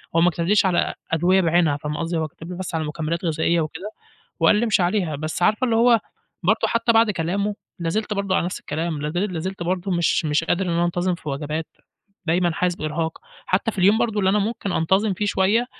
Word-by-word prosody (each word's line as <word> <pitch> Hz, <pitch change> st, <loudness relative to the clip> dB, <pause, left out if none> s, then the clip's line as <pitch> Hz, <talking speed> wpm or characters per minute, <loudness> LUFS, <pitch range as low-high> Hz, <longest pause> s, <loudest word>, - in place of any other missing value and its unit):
هو 165 Hz, -, +5 dB
ما 175 Hz, -, +5 dB
كَتَبليش 175 Hz, +5 st, +2 dB
على 180 Hz, -2 st, +1 dB, 0.2 s
أدوية 175 Hz, +4 st, +3 dB
بعينها 165 Hz, -4 st, +2 dB
فاهمة 150 Hz, +1 st, -4 dB
قصدي، 165 Hz, +1 st, -2 dB
هو 160 Hz, -1 st, -1 dB
كَتَب 165 Hz, +2 st, -12 dB
لي 180 Hz, -, -6 dB
بس 185 Hz, -2 st, -4 dB
على 160 Hz, -, 0 dB
مكمِّلات 160 Hz, +3 st, -3 dB
غذائية 165 Hz, +1 st, +1 dB
وكده، 170 Hz, +7 st, -5 dB, 0.5 s
وقال 165 Hz, +5 st, +5 dB
لي 220 Hz, -, +2 dB
امشي 215 Hz, -4 st, +2 dB
عليها، 175 Hz, -4 st, 0 dB
بس 155 Hz, +4 st, -4 dB
عارفة 215 Hz, +7 st, +3 dB
اللي 230 Hz, -3 st, +1 dB
هو 235 Hz, 0 st, +5 dB, 0.4 s
برضه 210 Hz, +6 st, +2 dB
حتى 230 Hz, 0 st, +2 dB
بعد 225 Hz, -1 st, +4 dB
كلامُه، 200 Hz, +3 st, -1 dB, 0.2 s
لا 170 Hz, -2 st, -2 dB
زلت 210 Hz, +4 st, -1 dB
برضه 195 Hz, -1 st, 0 dB
على -, -, +1 dB
نَفْس 180 Hz, -, -4 dB
الكلام، 155 Hz, 0 st, -3 dB
لا 150 Hz, -, -2 dB
زل 185 Hz, +4 st, -1 dB
لا 170 Hz, -, -3 dB
زلت 190 Hz, +1 st, -4 dB
برضه 180 Hz, +2 st, -2 dB
مش، 170 Hz, -2 st, +1 dB
مش 150 Hz, +1 st, +1 dB
قادر 185 Hz, +3 st, 0 dB
إن -, -, -1 dB
أنا 170 Hz, 0 st, +1 dB
أنتظِم 175 Hz, +1 st, 0 dB
في 160 Hz, -, -9 dB
وجبات، 150 Hz, +3 st, -3 dB, 0.6 s
دايمًا 175 Hz, +1 st, +2 dB
حاسس 180 Hz, +2 st, 0 dB
بإرهاق، 160 Hz, +1 st, -3 dB, 0.3 s
حتى 190 Hz, +4 st, +1 dB
في 205 Hz, -, -11 dB
اليوم 200 Hz, +4 st, +5 dB
برضه 220 Hz, -3 st, 0 dB
اللي 190 Hz, -1 st, +3 dB
أنا 210 Hz, -, +2 dB
ممكن 210 Hz, -1 st, -2 dB
أنتظِم 190 Hz, +6 st, +2 dB
فيه 205 Hz, +3 st, -2 dB
شوية، 205 Hz, +5 st, +2 dB
175 Hz, 230 wpm, -22 LUFS, 165-200 Hz, 0.6 s, هو